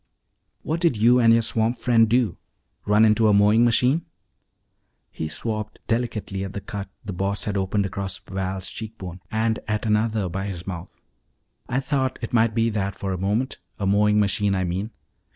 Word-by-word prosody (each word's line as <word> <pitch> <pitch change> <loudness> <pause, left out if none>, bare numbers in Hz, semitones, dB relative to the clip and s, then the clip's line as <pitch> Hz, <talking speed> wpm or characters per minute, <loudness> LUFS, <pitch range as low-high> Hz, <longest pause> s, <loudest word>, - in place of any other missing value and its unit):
What 160 +2 -1
did 170 -9 +2
you 120 +4 +5
and 115 -2 +6
your 115 0 +4
swamp 115 +1 0
friend 115 -1 +3
do 120 -4 +2 0.5
run 105 +2 +5
into 110 +1 +4
a 105 - +5
mowing 105 +3 +5
machine?" 125 +7 +2 1.0
He 80 - -4
swabbed 105 +7 -4
delicately 110 -4 -2
at 95 -1 -6
the 100 - -3
cut 100 -3 -6 0.2
the 100 - -4
Boss 100 +3 -2
had 105 - -2
opened 100 +1 0
across 95 0 -4
Val's 95 -1 -4
cheek 110 +2 -7
bone, 90 -1 -7
and 110 0 0
at 105 +1 -1
another 110 -1 +1
by 95 +3 -3
his 90 -3 -6
mouth. 90 -3 -7 0.7
"I 125 - +1
thought 135 -1 -1
it 115 - -5
might 110 -1 +3
be 115 0 +2
that 100 -2 -2
for 95 -1 -3
a - - -2
moment 105 +8 -1 0.2
a 100 - -2
mowing 105 +2 +3
machine, 100 -1 +1
I 95 - 0
mean. 90 +4 -2
105 Hz, 185 wpm, -24 LUFS, 95-115 Hz, 1.0 s, and